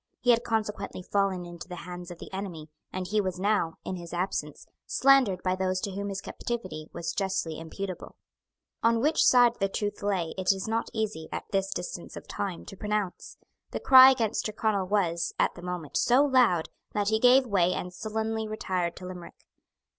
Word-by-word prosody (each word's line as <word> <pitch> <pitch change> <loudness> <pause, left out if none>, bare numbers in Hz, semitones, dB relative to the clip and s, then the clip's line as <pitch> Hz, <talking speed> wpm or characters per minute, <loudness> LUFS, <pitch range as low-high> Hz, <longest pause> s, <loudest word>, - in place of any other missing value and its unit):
He 245 - +4
had 235 0 +3
consequently 215 -5 -2
fallen 195 -2 0
into 175 0 -9
the 180 - -7
hands 180 0 -7
of 175 - -8
the - - -11
enemy; 175 -6 -6 0.2
and 185 0 -3
he 210 +3 +1
was 185 -2 -3
now, 195 -5 +1
in 185 - -3
his 170 0 -7
absence, 175 -5 -3 0.2
slandered 260 -9 +4
by 185 0 +1
those 185 0 0
to 200 - -3
whom 200 +1 -4
his 195 0 -4
captivity 185 -12 -5
was 170 - -4
justly 185 -5 -2
imputable. 185 +3 -6 0.7
On 230 0 +3
which 305 +6 +3
side 245 -2 +5
the 195 -1 +1
truth 205 +1 -3
lay 190 -5 -1
it 185 0 +3
is 195 +1 -3
not 225 +1 -1
easy, 215 -8 -3
at - - -4
this 195 0 0
distance - - -5
of - - -10
time, 190 -4 -4
to 195 - -9
pronounce. 210 -2 -3 0.3
The - - -4
cry 260 0 +9
against 230 -6 0
Tyrconnel 215 -3 0
was, 170 -4 0
at - - +2
the 175 - -11
moment, 180 -4 -4
so 255 +4 +4
loud, 245 - +3 0.2
that 205 -1 +1
he 220 0 +2
gave 255 +3 +6
way 185 -6 +2
and 180 0 -4
sullenly 220 +2 -3
retired 185 -5 -2
to 185 - -9
Limerick. 180 -1 -10
195 Hz, 190 wpm, -28 LUFS, 180-220 Hz, 0.7 s, cry